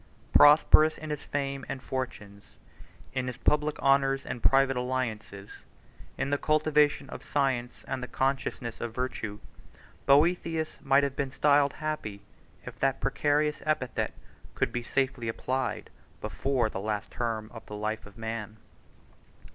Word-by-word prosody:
Prosperous 155 +1 +7
in 155 -1 -6
his 150 - -3
fame 140 -1 -3
and 135 - -3
fortunes, 110 -7 -6 0.6
in 130 -1 -2
his 125 -1 -4
public 150 +2 +1
honors 135 0 +2
and 125 -1 -5
private 135 0 +4
alliances, 115 -5 -4 0.6
in 140 - -1
the 145 - +1
cultivation 155 -1 +2
of - - -8
science 130 -4 -1
and 135 -1 -3
the 125 - -4
consciousness 130 -2 -2
of 115 -1 -4
virtue, 115 -5 -3 0.7
Boethius 160 +2 +3
might 140 +1 +4
have 140 -1 -1
been 140 -1 -1
styled 140 +1 +3
happy, 150 -10 -4 0.4
if - - -9
that 135 -1 +1
precarious 150 +2 +1
epithet 155 -5 -1 0.4
could - - 0
be 120 - -2
safely 130 -1 -1
applied 130 +3 -2 0.3
before 135 -4 0
the 105 - -5
last 105 +1 -3
term 115 -2 -3
of 115 -2 -9
the 105 - -7
life 110 +1 -3
of 100 +1 -16
man. 110 -1 -5
135 Hz, 140 wpm, -29 LUFS, 115-145 Hz, 0.7 s, Prosperous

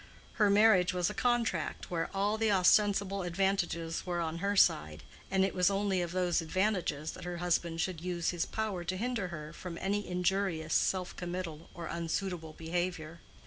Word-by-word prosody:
Her 210 - +6
marriage 200 -3 +5
was 180 +1 +1
a - - -6
contract 230 -8 0
where 165 -2 -1
all 200 +2 +1
the 220 -1 +1
ostensible 200 +1 +3
advantages 175 -2 -1
were 175 -1 -2
on 165 0 -2
her 200 +3 0
side, 75 - +3 0.3
and 190 0 +3
it 195 - -2
was 180 0 +3
only 195 -2 +1
of 175 -1 -3
those 180 -2 +1
advantages 170 -3 -1
that - - -10
her 175 0 -4
husband 170 -1 0
should 175 -2 -2
use 175 -1 -1
his 175 -2 -2
power 215 -5 -2
to 185 +2 -3
hinder 230 -3 -1
her 155 -2 -7
from 170 -1 -7
any 205 +3 -1
injurious 180 -3 0
self 185 -2 +1
committal 175 -3 -5
or 170 - -6
unsuitable 170 -1 -3
behavior. 165 0 -3
180 Hz, 175 wpm, -32 LUFS, 170-195 Hz, 0.3 s, Her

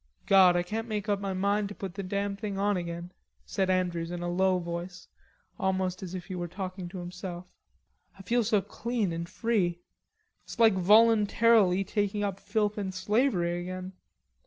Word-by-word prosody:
"God, 190 -2 +6
I 175 - +1
can't 220 +5 -4
make 210 -2 -3
up 205 -1 +1
my 195 -1 -3
mind 200 +2 0
to 205 - -8
put 190 -3 -6
the 200 - -5
damn 200 +1 -2
thing 200 -1 -5
on 205 +1 +1
again," 170 0 -5 0.3
said 190 -1 -1
Andrews 175 -3 0
in 175 0 -5
a 175 - -2
low 185 +1 +2
voice, 170 +1 -6 0.5
almost 185 -1 -1
as 185 -1 -6
if 180 -2 -6
he 190 - -7
were 175 -1 -3
talking 185 0 -6
to 185 - -8
himself; 180 0 -7 0.7
"I 195 - -11
feel 235 +5 +1
so 210 -2 +2
clean 225 -6 -2
and 170 +1 -5
free. 205 -7 0 0.7
It's - - -10
like 225 -2 +6
voluntarily 210 0 +5
taking 205 0 -1
up 195 -1 -2
filth 210 -1 -1
and 195 -2 -3
slavery 185 -3 +1
again.... 185 +1 -6
190 Hz, 180 wpm, -29 LUFS, 180-205 Hz, 0.7 s, God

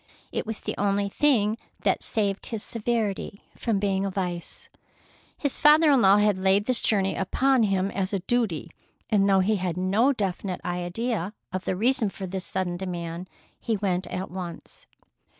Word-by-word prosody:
It - - -3
was 220 -1 -4
the - - -3
only 200 0 +1
thing 225 -4 +2 0.2
that - - +1
saved 200 -3 -1
his 225 -3 -4
severity 220 -3 -2
from 225 -3 0
being 195 -1 0
a 200 - 0
vice. 180 -3 -4 0.7
His 285 -3 -1
father 300 +1 +6
in 270 -3 +5
law 195 0 +6
had 210 -2 +3
laid 195 +2 +3
this 255 0 +1
journey 195 -3 +2
upon 260 +7 +2
him 195 -2 +1
as 190 -1 -2
a 200 - +1
duty, 190 -6 -1 0.4
and 200 -2 +4
though 195 -1 +5
he 210 +3 +2
had 180 -2 -2
no 200 +9 +3
definite 195 -5 -3
idea 180 +3 -2 0.2
of 185 0 -3
the - - 0
reason 225 +1 +2
for 195 0 -7
this 185 0 -4
sudden 175 -2 -2
demand, 175 -1 -5 0.3
he 225 -2 -1
went 185 -2 -1
at 185 -1 -5
once. 180 -2 -8
195 Hz, 170 wpm, -26 LUFS, 185-220 Hz, 0.7 s, father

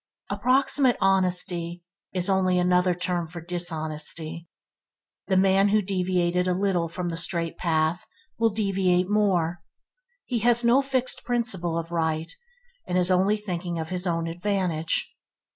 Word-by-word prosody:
Approximate 260 0 +2
honesty 180 -2 +1 0.3
is 180 0 -1
only 190 -2 +2
another 180 0 +2
term 175 -1 -2
for 170 +2 -8
dishonesty. 165 -1 -3 0.8
The 190 - +2
man 195 +1 +4
who 215 +1 +3
deviated 180 -1 0
a 180 - +1
little 185 -3 0
from 175 +1 -4
the 165 - -4
straight 170 -1 0
path, 160 0 0 0.3
will 230 0 +4
deviate 195 -3 0
more. 175 -5 +1 0.6
He 245 -3 -1
has 240 +2 +3
no 240 +3 +5
fixed 260 -2 -2
principle 225 -9 -1
of 165 0 -5
right 160 -1 -1 0.5
and 180 - 0
is 180 0 +2
only 190 +4 +3
thinking 180 -4 -4
of 160 -1 -4
his 180 0 -2
own 165 -1 -1
advantage. 175 -2 -1
180 Hz, 140 wpm, -25 LUFS, 170-195 Hz, 0.8 s, no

